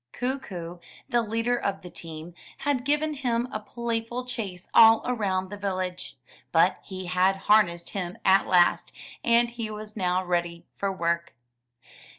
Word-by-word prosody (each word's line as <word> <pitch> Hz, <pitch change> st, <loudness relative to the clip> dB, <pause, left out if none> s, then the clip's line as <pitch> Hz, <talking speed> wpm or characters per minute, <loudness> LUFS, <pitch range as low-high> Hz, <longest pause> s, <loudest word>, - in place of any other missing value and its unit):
Kookoo, 195 Hz, -10 st, -4 dB, 0.3 s
the 240 Hz, -, +3 dB
leader 230 Hz, +2 st, 0 dB
of 200 Hz, -5 st, -3 dB
the 180 Hz, -, -8 dB
team, 165 Hz, +1 st, -8 dB, 0.2 s
had 280 Hz, -3 st, 0 dB
given 300 Hz, +2 st, +1 dB
him 245 Hz, -4 st, -1 dB
a 215 Hz, -, -3 dB
playful 235 Hz, +2 st, -4 dB
chase 205 Hz, -8 st, -5 dB
all 225 Hz, 0 st, +8 dB
around 195 Hz, -6 st, -1 dB
the 205 Hz, -, -6 dB
village; 185 Hz, -2 st, -3 dB, 0.3 s
but -, -, +3 dB
he 185 Hz, -1 st, -7 dB
had 185 Hz, +2 st, +2 dB
harnessed 175 Hz, -5 st, +3 dB
him 180 Hz, -3 st, -4 dB
at 190 Hz, +1 st, +5 dB
last, 175 Hz, -1 st, +3 dB, 0.3 s
and 235 Hz, 0 st, +4 dB
he 230 Hz, -2 st, -5 dB
was 215 Hz, 0 st, -7 dB
now 185 Hz, -2 st, 0 dB
ready 175 Hz, -1 st, -2 dB
for 200 Hz, -1 st, -1 dB
work. 170 Hz, -2 st, -2 dB
200 Hz, 150 wpm, -26 LUFS, 180-235 Hz, 0.3 s, all